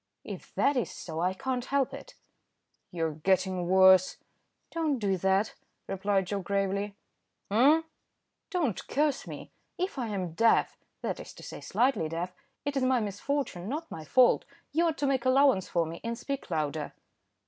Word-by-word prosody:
"If -, -, -9 dB
that 285 Hz, -, +3 dB
is 245 Hz, -, 0 dB
so 160 Hz, -2 st, -6 dB
I 180 Hz, +2 st, +1 dB
can't 255 Hz, +3 st, -2 dB
help 275 Hz, -1 st, +1 dB
it." 275 Hz, 0 st, -10 dB, 0.7 s
"You're 165 Hz, -2 st, -1 dB
getting 185 Hz, +3 st, +1 dB
worse." 190 Hz, 0 st, +6 dB, 0.5 s
"Don't 315 Hz, -4 st, 0 dB
do 200 Hz, -4 st, +1 dB
that," 190 Hz, +3 st, +1 dB, 0.3 s
replied 195 Hz, 0 st, 0 dB
Joe 200 Hz, +2 st, -2 dB
gravely. 200 Hz, +1 st, -1 dB, 0.6 s
"Eh?" 280 Hz, +9 st, +5 dB, 0.7 s
"Don't 325 Hz, -, -1 dB
curse 295 Hz, -1 st, 0 dB
me. -, -, -8 dB, 0.3 s
If 365 Hz, -5 st, -2 dB
I 240 Hz, -, -1 dB
am 190 Hz, -5 st, -3 dB
deaf, 225 Hz, +7 st, +3 dB, 0.3 s
that -, -, -2 dB
is -, -, -9 dB
to -, -, -13 dB
say -, -, -8 dB
slightly 245 Hz, -11 st, +1 dB
deaf, 170 Hz, +3 st, -3 dB, 0.3 s
it 285 Hz, 0 st, -2 dB
is 270 Hz, -, +1 dB
my 255 Hz, -1 st, +3 dB
misfortune, 210 Hz, -2 st, -2 dB
not 315 Hz, +5 st, -4 dB
my 160 Hz, -, -6 dB
fault; 245 Hz, -, +4 dB, 0.3 s
you 335 Hz, +3 st, +2 dB
ought 320 Hz, -1 st, -1 dB
to 290 Hz, -, 0 dB
make 270 Hz, -3 st, +1 dB
allowance 255 Hz, -6 st, +4 dB
for 170 Hz, -1 st, +1 dB
me, 165 Hz, +1 st, -7 dB
and 230 Hz, 0 st, -3 dB
speak 275 Hz, +2 st, -5 dB
louder." 155 Hz, -2 st, -2 dB
205 Hz, 165 wpm, -29 LUFS, 185-275 Hz, 0.7 s, worse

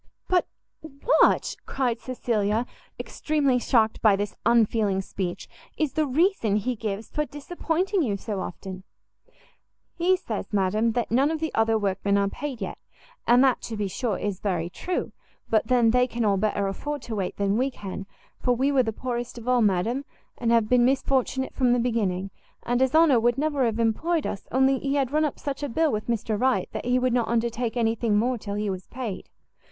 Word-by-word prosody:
"But 360 Hz, -1 st, +2 dB, 0.6 s
what," -, -, +3 dB
cried 250 Hz, -4 st, -1 dB
Cecilia, 230 Hz, -3 st, -1 dB, 0.3 s
extremely 285 Hz, -5 st, 0 dB
shocked 225 Hz, -3 st, +2 dB
by 215 Hz, -3 st, +5 dB
this 205 Hz, +1 st, -3 dB
unfeeling 220 Hz, -4 st, +3 dB
speech, 185 Hz, -2 st, -5 dB, 0.3 s
"is 310 Hz, -3 st, 0 dB
the 310 Hz, -1 st, +1 dB
reason 280 Hz, -, +2 dB
he 240 Hz, +4 st, -1 dB
gives 215 Hz, -1 st, -5 dB
for 300 Hz, -, 0 dB
disappointing 335 Hz, -, -2 dB
you 215 Hz, -9 st, 0 dB
so 205 Hz, 0 st, -4 dB
often?" 185 Hz, 0 st, -7 dB, 1.1 s
"He 365 Hz, +2 st, +2 dB
says, 225 Hz, -, -5 dB
madam, 210 Hz, +3 st, +1 dB
that 240 Hz, -1 st, -2 dB
none 265 Hz, +5 st, +3 dB
of 320 Hz, 0 st, -2 dB
the 320 Hz, -1 st, -3 dB
other 225 Hz, 0 st, +2 dB
workmen 200 Hz, -1 st, 0 dB
are 200 Hz, 0 st, +2 dB
paid 260 Hz, +2 st, -5 dB
yet; 190 Hz, -, -5 dB, 0.5 s
and 245 Hz, +2 st, +6 dB
that, 265 Hz, -2 st, +3 dB
to 225 Hz, -, -6 dB
be 205 Hz, -1 st, -1 dB
sure, 210 Hz, +2 st, -2 dB
is 200 Hz, -3 st, -3 dB
very 175 Hz, -4 st, -2 dB
true; 360 Hz, -, -3 dB, 0.4 s
but 220 Hz, -1 st, +2 dB
then 240 Hz, -2 st, +4 dB
they 250 Hz, +1 st, +3 dB
can 235 Hz, -2 st, -2 dB
all 200 Hz, -1 st, +3 dB
better 205 Hz, 0 st, 0 dB
afford 290 Hz, +8 st, -4 dB
to 225 Hz, -, -5 dB
wait 195 Hz, -3 st, -3 dB
than 200 Hz, 0 st, +1 dB
we 260 Hz, +4 st, +1 dB
can, 195 Hz, -5 st, -7 dB, 0.3 s
for 250 Hz, -1 st, +1 dB
we 270 Hz, +4 st, +1 dB
were 270 Hz, -2 st, +4 dB
the 225 Hz, -3 st, -1 dB
poorest 240 Hz, +1 st, -4 dB
of 235 Hz, 0 st, -9 dB
all, 250 Hz, -1 st, +3 dB
madam, 215 Hz, +6 st, +1 dB, 0.3 s
and 235 Hz, -1 st, -1 dB
have 230 Hz, -2 st, +4 dB
been 245 Hz, +1 st, +4 dB
misfortunate 265 Hz, 0 st, +1 dB
from 250 Hz, -2 st, +2 dB
the 245 Hz, -, +2 dB
beginning: 200 Hz, -6 st, -1 dB, 0.3 s
and 245 Hz, +1 st, 0 dB
his 265 Hz, +2 st, +2 dB
honour 315 Hz, -6 st, +6 dB
would 240 Hz, +2 st, +2 dB
never 290 Hz, -2 st, +1 dB
have 225 Hz, -2 st, 0 dB
employed 295 Hz, +9 st, +1 dB
us, 195 Hz, -, -5 dB
only 265 Hz, +1 st, +3 dB
he 275 Hz, 0 st, -1 dB
had 270 Hz, -3 st, 0 dB
run 305 Hz, +1 st, +2 dB
up 295 Hz, -, -3 dB
such 280 Hz, -1 st, -4 dB
a 290 Hz, -, -2 dB
bill 315 Hz, +5 st, +1 dB
with 215 Hz, -2 st, -3 dB
Mr 225 Hz, -2 st, -1 dB
Wright, 260 Hz, 0 st, +1 dB
that -, -, -5 dB
he 250 Hz, +1 st, +2 dB
would 255 Hz, -1 st, +1 dB
not 240 Hz, -2 st, +1 dB
undertake 235 Hz, +1 st, -1 dB
any 225 Hz, -1 st, +2 dB
thing 225 Hz, -2 st, +1 dB
more 245 Hz, +3 st, +1 dB
till 200 Hz, -1 st, -5 dB
he 210 Hz, 0 st, -2 dB
was 185 Hz, -2 st, -4 dB
paid. 235 Hz, -7 st, -6 dB
235 Hz, 200 wpm, -25 LUFS, 210-265 Hz, 1.1 s, and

